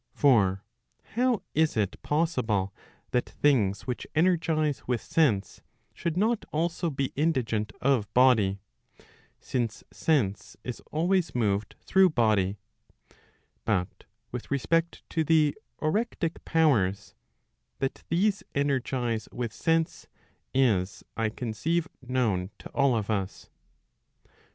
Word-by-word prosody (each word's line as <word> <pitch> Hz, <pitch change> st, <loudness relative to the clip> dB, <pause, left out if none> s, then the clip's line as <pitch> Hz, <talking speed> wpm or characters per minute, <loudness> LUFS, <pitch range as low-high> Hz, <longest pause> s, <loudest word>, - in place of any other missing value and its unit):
For 100 Hz, -9 st, +4 dB, 0.5 s
how 245 Hz, -1 st, +1 dB
is 155 Hz, -4 st, +2 dB
it 100 Hz, -3 st, -1 dB
possible 125 Hz, -, 0 dB, 0.4 s
that 125 Hz, -, 0 dB
things 105 Hz, -9 st, +2 dB
which 125 Hz, -1 st, -4 dB
energize 160 Hz, -4 st, +1 dB
with 125 Hz, -2 st, +1 dB
sense, 110 Hz, -, +1 dB, 0.3 s
should 170 Hz, -1 st, -3 dB
not 220 Hz, +3 st, +2 dB
also 170 Hz, +2 st, 0 dB
be 135 Hz, -2 st, -2 dB
indigent 120 Hz, -9 st, 0 dB
of 125 Hz, -6 st, +2 dB
body, 115 Hz, -7 st, +5 dB, 0.8 s
since 120 Hz, -4 st, -2 dB
sense 105 Hz, -10 st, 0 dB
is 125 Hz, -2 st, -5 dB
always 175 Hz, +1 st, +1 dB
moved 105 Hz, -3 st, 0 dB
through 190 Hz, -1 st, +4 dB
body 105 Hz, -, +2 dB, 0.5 s
P -, -, -26 dB, 0.5 s
But 95 Hz, -5 st, -1 dB, 0.3 s
with 125 Hz, -1 st, -6 dB
respect 165 Hz, +5 st, 0 dB
to 160 Hz, -, +1 dB
the 155 Hz, -2 st, +3 dB, 0.2 s
orectic 165 Hz, 0 st, -1 dB
powers, 125 Hz, -, +2 dB, 0.6 s
that 135 Hz, -, -3 dB
these 195 Hz, +4 st, +2 dB
energize 130 Hz, -5 st, 0 dB
with 120 Hz, -3 st, -4 dB
sense, 165 Hz, 0 st, 0 dB, 0.4 s
is 105 Hz, -8 st, +1 dB
I 115 Hz, -1 st, 0 dB
conceive 130 Hz, +10 st, -1 dB
known 120 Hz, -8 st, 0 dB
to -, -, -11 dB
all 135 Hz, -3 st, +3 dB
of 110 Hz, -1 st, -1 dB
us. 100 Hz, -3 st, -3 dB
130 Hz, 110 wpm, -28 LUFS, 110-160 Hz, 0.8 s, body